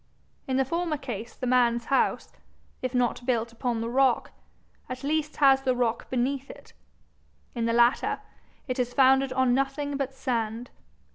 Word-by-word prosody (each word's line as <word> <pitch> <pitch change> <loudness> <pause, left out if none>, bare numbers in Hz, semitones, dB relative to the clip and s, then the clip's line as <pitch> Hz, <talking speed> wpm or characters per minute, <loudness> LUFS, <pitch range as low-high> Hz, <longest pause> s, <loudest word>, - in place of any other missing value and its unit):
In 260 -1 0
the 265 - +2
former 335 +2 -1
case 240 -5 -7
the 255 - -5
man's 240 -2 +2
house, 275 - 0 0.5
if 255 0 -3
not 245 0 0
built 235 -2 0
upon 235 0 -2
the 230 - -2
rock, 255 +1 +2 0.6
at 255 +1 -6
least 305 +1 -1
has 270 -2 +5
the 260 -2 +1
rock 240 -2 -1
beneath 260 +2 -1
it; - - -13 0.8
in 235 -2 -2
the - - +1
latter, 240 +2 +3 0.5
it 255 -1 -3
is 245 0 -1
founded 270 0 +4
on 255 -1 +2
nothing 275 +2 -1
but 270 -1 -3
sand. 230 -2 -3
255 Hz, 160 wpm, -27 LUFS, 240-270 Hz, 0.8 s, has